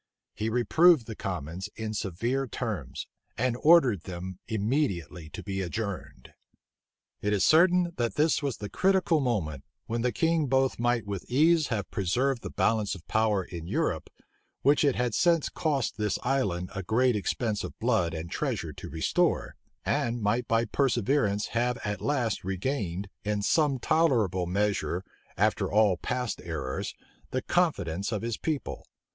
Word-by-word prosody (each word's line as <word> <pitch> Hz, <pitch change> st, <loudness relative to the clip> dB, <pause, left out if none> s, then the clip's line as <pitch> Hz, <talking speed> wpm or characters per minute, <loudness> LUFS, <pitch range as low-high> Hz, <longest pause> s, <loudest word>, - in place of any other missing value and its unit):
He 110 Hz, +2 st, -2 dB
reproved 135 Hz, +5 st, +4 dB
the 110 Hz, -, -6 dB
commons 90 Hz, +1 st, -4 dB
in 110 Hz, -1 st, -4 dB
severe 115 Hz, +7 st, -1 dB
terms, -, -, -4 dB, 0.3 s
and 125 Hz, +1 st, +1 dB
ordered 140 Hz, -, +6 dB
them 90 Hz, 0 st, -6 dB
immediately 100 Hz, -, -1 dB
to -, -, -8 dB
be 95 Hz, -1 st, -3 dB
adjourned. 100 Hz, +1 st, -5 dB, 0.9 s
It 105 Hz, +1 st, 0 dB
is 100 Hz, -2 st, +3 dB
certain, 175 Hz, +1 st, +5 dB
that 120 Hz, -1 st, -1 dB
this 155 Hz, +2 st, +2 dB
was 140 Hz, -6 st, -2 dB
the 105 Hz, -, -5 dB
critical 185 Hz, -, +2 dB
moment, 90 Hz, -, -1 dB, 0.2 s
when 115 Hz, +1 st, -2 dB
the 125 Hz, +1 st, +1 dB
king 165 Hz, 0 st, +1 dB
both 135 Hz, -1 st, +2 dB
might 120 Hz, -2 st, +1 dB
with 100 Hz, -2 st, -5 dB
ease 155 Hz, +4 st, +4 dB
have 105 Hz, -4 st, -3 dB
preserved 120 Hz, +7 st, 0 dB
the -, -, -5 dB
balance 110 Hz, -3 st, +1 dB
of 90 Hz, -, -14 dB
power 110 Hz, -3 st, +2 dB
in 85 Hz, -2 st, -8 dB
Europe, -, -, -1 dB, 0.5 s
which 145 Hz, +3 st, +4 dB
it 140 Hz, -3 st, +3 dB
has 120 Hz, -3 st, 0 dB
since 170 Hz, -3 st, +3 dB
cost 145 Hz, -10 st, -1 dB
this 105 Hz, -3 st, 0 dB
island 100 Hz, -9 st, 0 dB
a 95 Hz, -, -3 dB
great 120 Hz, +6 st, +2 dB
expense 105 Hz, +1 st, -1 dB
of -, -, -7 dB
blood 110 Hz, -9 st, +1 dB
and 80 Hz, +1 st, -6 dB
treasure -, -, -2 dB
to -, -, -9 dB
restore, 80 Hz, +2 st, 0 dB, 0.3 s
and 120 Hz, 0 st, 0 dB
might 115 Hz, +4 st, +1 dB
by 115 Hz, +1 st, +2 dB
perseverance 120 Hz, -3 st, +1 dB
have 120 Hz, +1 st, 0 dB
at 105 Hz, -2 st, -3 dB
last 125 Hz, -7 st, 0 dB
regained, 95 Hz, -1 st, -2 dB, 0.2 s
in 105 Hz, -1 st, -1 dB
some 145 Hz, +2 st, +3 dB
tolerable 115 Hz, -, +2 dB
measure, 100 Hz, -1 st, 0 dB, 0.3 s
after -, -, +1 dB
all 105 Hz, -3 st, +4 dB
past 125 Hz, +6 st, -3 dB
errors, 75 Hz, -6 st, -4 dB, 0.3 s
the 130 Hz, -, -2 dB
confidence 105 Hz, -, 0 dB
of 105 Hz, -1 st, -2 dB
his 115 Hz, -1 st, -1 dB
people. 155 Hz, -4 st, -3 dB
110 Hz, 155 wpm, -28 LUFS, 95-135 Hz, 0.9 s, ordered